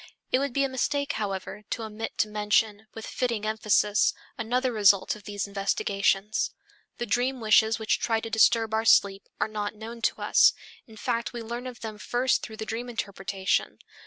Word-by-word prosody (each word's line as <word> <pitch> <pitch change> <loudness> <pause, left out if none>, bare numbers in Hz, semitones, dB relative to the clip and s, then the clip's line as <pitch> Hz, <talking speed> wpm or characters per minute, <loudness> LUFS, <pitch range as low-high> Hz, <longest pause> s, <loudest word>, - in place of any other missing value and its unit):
It 255 - +3
would 280 0 -1
be 275 +3 +1
a - - +2
mistake, 280 +2 -1
however, 200 -1 -4
to 230 - -3
omit 220 +1 -6
to - - +2
mention, 210 0 0
with 225 - -7
fitting 235 -4 -2
emphasis, 210 -1 +2 0.2
another 250 +3 0
result 200 -3 +4
of 210 -1 -14
these 205 -1 -3
investigations. 200 +1 0 0.5
The 240 - -3
dream 250 +4 0
wishes 220 0 +4
which 220 -1 0
try 225 -1 +1
to 225 - -6
disturb 225 0 +3
our 220 0 +1
sleep 195 -3 +3
are - - +1
not 210 -1 -4
known 230 +2 -9
to - - 0
us, - - +5 0.3
in 220 -1 -14
fact 235 0 -2
we 240 -1 -5
learn 240 +3 -5
of 250 -1 -9
them 215 -2 -6
first 245 +4 +1
through 220 -2 -8
the 220 - -5
dream 235 +3 -4
interpretation. 195 -4 -2
220 Hz, 185 wpm, -27 LUFS, 210-235 Hz, 0.5 s, us